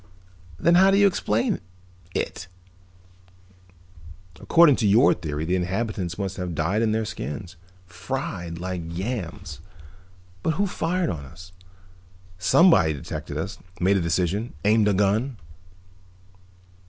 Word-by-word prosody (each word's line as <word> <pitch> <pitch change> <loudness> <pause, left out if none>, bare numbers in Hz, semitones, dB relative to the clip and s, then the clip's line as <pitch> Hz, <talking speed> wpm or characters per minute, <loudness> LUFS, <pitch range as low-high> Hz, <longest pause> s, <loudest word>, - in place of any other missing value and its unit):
"Then 170 - +3
how 190 +2 +6
do 195 - +4
you 205 - +5
explain 115 - +1 0.6
it? 85 - -3 1.9
According 165 -5 +5
to 110 - +1
your 115 +8 +5
theory 75 -1 -4
the 90 +3 0
inhabitants 95 -1 -2
must 95 -2 -4
have 90 -3 -4
died 85 +8 0
in 110 -1 +2
their 110 0 0
skins, 90 - -6 0.3
fried 90 -6 -5
like 90 0 -4
yams. 90 +3 -5 0.8
But 160 +9 0
who 200 - +1
fired 180 - -1
on 75 -5 -6
us? 90 +6 -13 0.9
Somebody 95 - +5
detected 70 - -6
us, - - -5 0.2
made 95 +2 +3
a 95 - +1
decision, 90 +6 -1
aimed 105 0 +4
a 100 - +2
gun." 105 +6 +1
100 Hz, 125 wpm, -24 LUFS, 85-120 Hz, 1.9 s, how